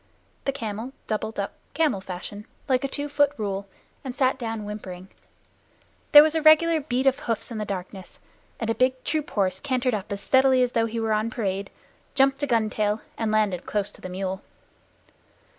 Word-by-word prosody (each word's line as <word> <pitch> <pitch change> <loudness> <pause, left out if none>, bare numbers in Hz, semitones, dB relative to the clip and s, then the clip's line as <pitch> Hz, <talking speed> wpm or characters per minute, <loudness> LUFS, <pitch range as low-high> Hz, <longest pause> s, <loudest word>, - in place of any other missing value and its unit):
The 275 - +2
camel 230 -1 -5
doubled 215 0 -3
up 200 - -2 0.2
camel 305 -12 +2
fashion, 190 +3 -7 0.2
like 255 -1 +2
a - - +1
two 290 +2 -4
foot 290 -1 +3
rule, 200 -2 -3 0.4
and 255 -2 -5
sat 265 0 +2
down 225 -3 -4
whimpering. 190 -3 -7 1.0
There 295 -1 +11
was 310 0 +1
a 320 - +1
regular 315 +1 +6
beat 260 -2 -1
of 270 -1 +3
hoofs 230 +1 -3
in 225 - -4
the 210 - -2
darkness, 190 -1 -6 0.4
and 225 -1 0
a - - +2
big 255 +2 +1
troop 305 0 -1
horse 190 -3 0
cantered 255 -2 0
up 205 -2 -3
as 200 - -2
steadily 260 +2 +4
as 245 - 0
though 230 -1 +1
he 230 +1 -3
were 225 -1 +1
on 215 +1 +1
parade, 200 -4 -2 0.5
jumped 270 0 +3
a 285 - 0
gun 230 -4 +2
tail, 210 0 0
and 225 -1 -1
landed 210 -5 +1
close 205 -1 -1
to - - -18
the 185 - -6
mule. 190 +1 -3
225 Hz, 190 wpm, -25 LUFS, 205-265 Hz, 1.0 s, There